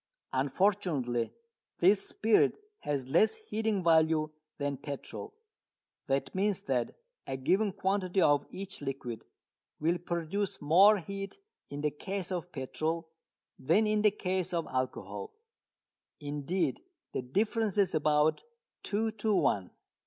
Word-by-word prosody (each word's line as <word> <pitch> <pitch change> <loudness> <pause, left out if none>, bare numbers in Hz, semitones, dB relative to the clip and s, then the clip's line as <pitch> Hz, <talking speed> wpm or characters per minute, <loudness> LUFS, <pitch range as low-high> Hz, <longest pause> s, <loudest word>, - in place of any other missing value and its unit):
Unfortunately 135 - +1 0.5
this 195 +3 +4
spirit 220 0 +3 0.2
has 140 -3 -2
less 170 +11 +4
heating 220 - -2
value 160 -2 +4 0.3
than 145 -1 -1
petrol. 145 - -7 0.7
That 135 0 0
means 195 0 0
that 125 -3 -1 0.3
a 130 - -2
given 195 +10 +2
quantity 190 0 0
of 145 -5 +4
each 195 -2 -7
liquid 135 -4 -5 0.6
will 170 +3 +1
produce 175 +4 -2
more 190 +8 +6
heat 195 - -6 0.3
in 145 0 -5
the 150 0 +1
case 190 +4 -4
of 175 -1 -3
petrol 160 +4 -3 0.5
than 170 +11 +3
in 215 0 +2
the 210 - +6
case 185 -3 -2
of 165 -2 0
alcohol. 130 - -3 0.8
Indeed 150 - -1 0.3
the - - -1
difference 210 - 0
is 200 -3 +3
about 150 0 +2 0.4
two 220 +2 -1
to 215 -1 +2
one. 95 - +2
170 Hz, 125 wpm, -31 LUFS, 145-200 Hz, 0.8 s, more